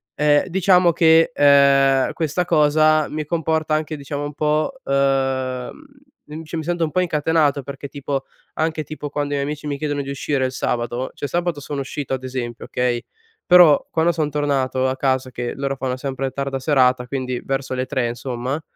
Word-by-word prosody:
E 150 +2 +3
diciamo 180 -1 +4
che, 160 0 +5
ehm, 140 -2 +4
questa 165 +2 -1
cosa 155 -1 +3
mi 155 0 -4
comporta 160 -1 -1
anche 155 0 -1
diciamo 145 +1 -5
un 145 - -6
po' 155 - 0
uhm, 135 -2 0 0.7
cioè 160 +1 -6
mi 160 - -3
sento 170 +1 -1
un 155 - -1
po' 185 - 0
incatenato, 150 -4 +1
perché 140 +1 -7
tipo 140 0 -4 0.3
anche 160 -1 -1
tipo 150 -1 -7
quando 145 0 -3
i - - 0
miei 140 - -1
amici 150 0 -5
mi 145 -1 -2
chiedono 145 -1 -2
di 140 - -7
uscire 140 -1 -1
il 130 - -2
sabato 120 0 -2
cioè 145 - -4
sabato 170 -2 -2
sono 140 +1 -5
uscito 135 0 -5
ad 130 -1 -3
esempio 125 -2 -5
okay, 125 -1 -1 0.4
però 175 -5 +6
quando 165 +1 +2
son 155 -3 -1
tornato 135 -3 0
a 130 - -3
casa 130 -1 0
che 120 0 -4
loro 135 0 -2
fanno 130 -1 -2
sempre 135 0 -3
tarda 135 0 -3
serata, 130 -3 +2
quindi 130 -2 -3
verso 135 -1 -3
le 130 0 -2
3 130 -5 -1
insomma, 125 +4 -4
140 Hz, 180 wpm, -21 LUFS, 130-155 Hz, 0.7 s, però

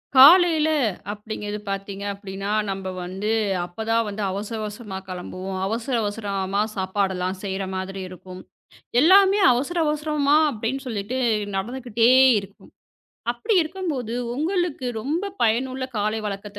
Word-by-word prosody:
காலையில 315 +2 +8 0.4
அப்படிங்குறது 210 0 -6
பாத்தீங்க. 195 0 -4
அப்படின்னா 195 0 -6 0.2
நம்ம 190 -1 -3
வந்து 195 +4 -3 0.3
அப்பதான் 225 +5 -1
வந்து 205 +1 -5
அவசர 205 +4 -4
அவசரமா 210 -2 -6
கிளம்புவோம். 185 +1 -5
அவசர 230 +4 -2
அவசரமா 200 -2 -2
சாப்பாடெல்லாம் 190 -1 -1
செய்ற 195 0 -3
மாதிரி 190 +1 -4
இருக்கும். 185 0 -10 0.6
எல்லாமே 390 +5 +6
அவசர 270 +8 -1
அவசரமா 300 -1 +1
அப்படின்னு 235 +3 -3
சொல்லிட்டு 225 +1 -3 0.4
நடந்துகிட்டே 235 +2 +1 0.3
இருக்கும். 195 0 -15 0.6
அப்படி 245 - -1
இருக்கும்போது 310 - -4 0.2
உங்களுக்கு 325 -2 -1
ரொம்ப 305 - -2 0.2
பயனுள்ள 255 +3 +1
காலை 215 +2 0
வழக்கத்த 205 0 -6
215 Hz, 110 wpm, -23 LUFS, 195-265 Hz, 0.6 s, காலையில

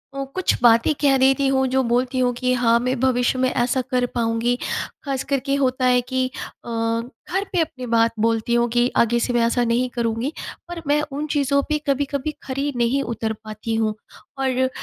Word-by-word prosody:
ओ, 275 - -2
कुछ 375 - +2
बातें 230 +5 +5
कह 275 -2 +4
देती 270 +1 +3
हूँ, 265 0 +2
जो 265 +1 +2
बोलती 250 +2 0
हूँ 250 -1 +2
कि 255 +1 0
हाँ, 235 -1 +3
मैं 255 +1 -1
भविष्य 255 0 +1
में 255 - +2
ऐसा 250 +1 0
कर 250 -1 +2
पाऊँगी। 230 +1 +1 0.5
खास 275 -2 -2
करके 275 0 0
होता 255 0 +1
है 250 0 +4
कि 255 +1 -1 0.4
अ, - - -7
घर 230 +10 -2
पे 360 - +2
अपनी 255 -5 -4
बात 230 0 +4
बोलती 225 +1 +1
हूँ 240 0 +3
कि 240 0 +3
आगे 235 +1 +3
से 245 - -1
मैं 240 - +2
ऐसा 240 +1 +1
नहीं 240 +2 +1
करूँगी, 235 +3 -1 0.4
पर 345 -1 -6
मैं 295 +1 +3
उन 290 +2 -3
चीज़ों 280 -1 +1
पे 305 - +2
कभी-कभी 280 +1 -1
खरी 275 +2 -2
नहीं 240 +4 +2
उतर 225 -1 -3
पाती 215 +1 -4
हूँ। 220 -1 0 0.4
और 260 -1 +1
250 Hz, 195 wpm, -22 LUFS, 235-270 Hz, 0.5 s, बातें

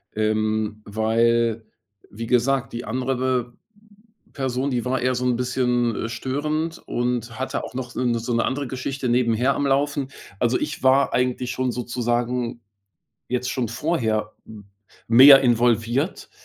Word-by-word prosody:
ähm, 110 0 -1
weil, 115 +1 +1 0.4
wie 115 +2 -7
gesagt, 125 +1 +1
die 120 +1 -5
andere 125 0 -1 0.8
Person, 130 0 -2
die 125 -2 -2
war 130 0 -1
eher 130 0 +1
so 125 +1 -2
'n 125 -1 +2
bisschen, 125 -2 0
äh, - - -4
störend 150 +7 -3
und 120 -1 -2
hatte 130 - -3
auch - - -8
noch, 125 -1 -6
äh, 125 -1 0
so 120 +1 -3
'ne 115 - +1
andere 135 0 -2
Geschichte 130 0 -4
nebenher 120 +2 +2
am 145 - -1
Laufen. 140 0 0 0.3
Also, 120 +1 +1
ich - - -4
war 135 +1 +4
eigentlich 125 0 0
schon 130 -1 -1
sozusagen 120 0 -2 0.7
jetzt 125 0 -1
schon 125 -4 -2
vorher 115 -6 -1
m 105 -2 -12 0.4
mehr 135 +4 +9
involviert, 120 - +1
125 Hz, 140 wpm, -23 LUFS, 115-130 Hz, 0.8 s, mehr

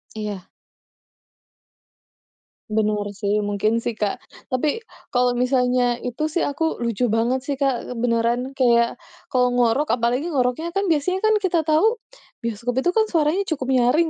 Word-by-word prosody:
Iya. 210 -4 -5 2.2
Benar 210 -1 0
sih, 205 +1 0
mungkin 210 +2 0
sih, 230 -1 -3
Kak. 210 -2 -2 0.3
Tapi, 295 - 0 0.3
kalau 245 0 +3
misalnya 250 -1 +2 0.2
itu 250 +5 -2
sih 325 +3 -1
aku 285 +3 -2 0.2
lucu 235 +1 0
banget 240 +3 +1
sih 285 - 0
Kak, 260 -2 -1
beneran 240 +2 +1
kayak 235 -2 +3 0.3
kalau 250 -2 +3
ngorok, 245 +4 +2
apalagi 245 +7 0
ngoroknya 270 +1 0
kan 395 - +1
biasanya 365 +5 +1
kan 435 0 +4
kita 355 -5 +1
tahu, 330 +10 +3 0.5
bioskop 235 +2 -3
itu 355 - +2
kan 440 - +5
suaranya 325 +2 +1
cukup 270 -4 -2
nyaring 260 +7 +3
250 Hz, 140 wpm, -22 LUFS, 230-305 Hz, 2.2 s, kan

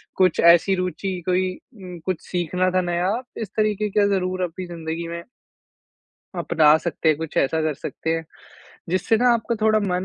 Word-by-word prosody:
कुछ 185 -3 +2
ऐसी 170 +3 +6
रूचि 185 +1 -3
कोई 185 +1 +2 0.3
उम, 180 -4 -9
कुछ 185 -4 -2
सीखना 180 +1 0
था 185 - +4
नया, 175 +2 0 0.2
इस 220 -4 -4
तरीके 215 -1 +1
का 205 - +5
ज़रूर 185 0 -2
अपनी 180 +1 -4
ज़िंदगी 165 -1 -5
में 170 0 -6 1.2
आप - - -5
बता 155 -2 +6
सकते 170 -1 -1
हैं 155 - +4
कुछ 160 -1 -6
ऐसा 160 +4 +2
कर 155 -1 0
सकते 160 - -5
हैं, 165 0 -1 0.7
जिससे 185 +5 +2
ना 245 +2 +3
आपका 235 0 -1
थोड़ा 215 0 +4
मन 185 -2 -1
180 Hz, 180 wpm, -22 LUFS, 170-190 Hz, 1.2 s, ऐसी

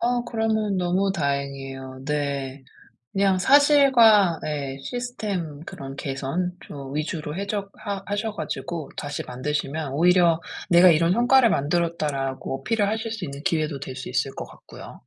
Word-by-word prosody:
어 245 0 +1
그러면 220 -3 0
너무 185 +2 +1
다행이에요. 135 -4 -3
네. 140 -2 -3 0.5
그냥 195 -1 +2
사실과 245 - +6
예. 140 -3 -3
시스템 205 - -4
그런 135 0 -8
개선 140 +7 -2
좀 140 -1 -8
위주로 155 0 -3
해적 200 0 -3
하 200 -2 -5
하셔 205 +2 -2
가지고 160 -1 -5
다시 145 0 -4
만드시면 145 +2 -3
오히려 170 +1 +4 0.3
"내가 175 +1 +7
이런 165 +2 +4
성과를 245 +1 +5
만들었다."라고 145 -4 -1
어필을 210 +6 0
하실 220 +1 -2
수 220 -4 -5
있는 140 0 -7
기회도 155 -3 0
될 130 -1 -7
수 130 - -7
있을 130 +2 0
것 - - -5
같고요. - - -12
170 Hz, 310 characters per minute, -24 LUFS, 140-205 Hz, 0.5 s, 내가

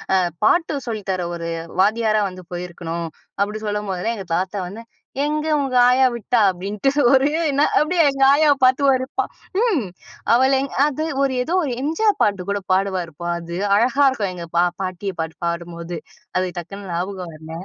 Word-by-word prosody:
அ - - +5 0.3
பாட்டு 325 +5 +3
சொல்லி 220 -2 -3
தர 185 -2 -1
ஒரு 170 0 -5 0.3
வாத்தியாரா 215 +1 +3
வந்து 185 0 -11
போயிருக்கணும்." 170 -1 -5 0.3
அப்பிடி 210 +2 0
சொல்லம்போதெல்லாம் 210 +1 -2
எங்க 195 - -6
தாத்தா 190 +3 -2
வந்து, 210 +6 -9 0.4
"எங்க 305 +1 -1 0.2
உங்க 265 -2 -2
ஆயா 260 +1 +5
விட்டா!" 235 0 +1
அப்பிடின்ட்டு 200 +8 -1 0.2
ஒரு, 270 +2 +4 0.2
என்ன 280 +2 +3
அப்பிடியே 325 +1 +3
எங்கள் 270 0 +4
ஆயாவ 290 -1 +4
பாத்து 260 +2 +3
ஒரு 260 0 -1
பா - - -2 0.4
ம் 395 - +2 0.5
அவள 260 +2 +4
எங் 275 - -4 0.2
அது 305 +2 -2 0.2
ஒரு 270 - +1
ஏதோ 340 +7 -1
ஒரு 255 - -2
எம்ஜிஆர் 400 +8 +1
பாட்டு 200 -3 0
கூட 200 0 -1
பாடுவாருப்பா! 180 -4 -1
அது, 170 +1 -6 0.2
அழகா 255 +6 +3
இருக்கும். 210 -7 -2
எங்க 170 -1 -7
பா 175 - +5 0.2
பாட்டிய 185 +1 -4
பாட்டு 160 -1 -5
பாடும்போது. 170 0 -4 0.4
அது 185 0 +1
டக்குனு 195 +3 -8
ஞாபகம் 180 0 -4
வரல. 160 +1 -11
205 Hz, 165 wpm, -21 LUFS, 180-265 Hz, 0.5 s, அ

